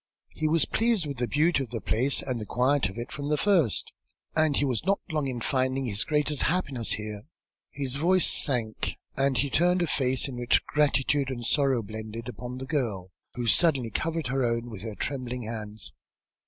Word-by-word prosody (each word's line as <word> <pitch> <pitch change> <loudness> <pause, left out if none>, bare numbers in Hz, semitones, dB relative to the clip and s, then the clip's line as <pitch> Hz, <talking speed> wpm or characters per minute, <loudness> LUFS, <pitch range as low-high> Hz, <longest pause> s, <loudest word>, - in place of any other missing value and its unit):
He 155 - -1
was 160 +1 +3
pleased 225 -6 +1
with 140 -2 -5
the 120 0 -1
beauty 150 +2 +2
of 130 - -5
the 115 - -4
place 125 +6 +1
and 125 -4 -3
the - - -5
quiet 130 -2 +2
of 95 - -11
it, 120 +1 -6
from 145 -1 -4
the 150 - +2
first, 175 - +2 0.4
and 155 -2 +3
he 145 - +2
was 125 -5 -1
not 195 +3 +1
long 150 -3 0
in 125 -3 -4
finding 130 +1 0
his 105 -3 0
greatest 150 -2 +1
happiness 140 -8 0
here." 105 +2 -6 0.4
His 135 -1 -3
voice 180 +4 +4
sank, 115 -6 +2 0.2
and 135 -1 +1
he 140 -1 +1
turned 180 +2 +3
a - - +2
face 130 -3 +1
in 130 -3 -7
which 120 0 +2
gratitude 145 -1 +1
and 120 -3 -5
sorrow 135 -3 +2
blended, 110 +2 -7
upon 125 0 -7
the 130 - -5
girl 110 - -2 0.2
who 120 - -3
suddenly 130 -2 +3
covered 165 +5 -2
her 135 0 0
own 115 0 -1
with 100 -4 -7
her 110 -1 -6
trembling 125 +1 -4
hands. 110 -1 -6
130 Hz, 195 wpm, -27 LUFS, 115-150 Hz, 0.4 s, voice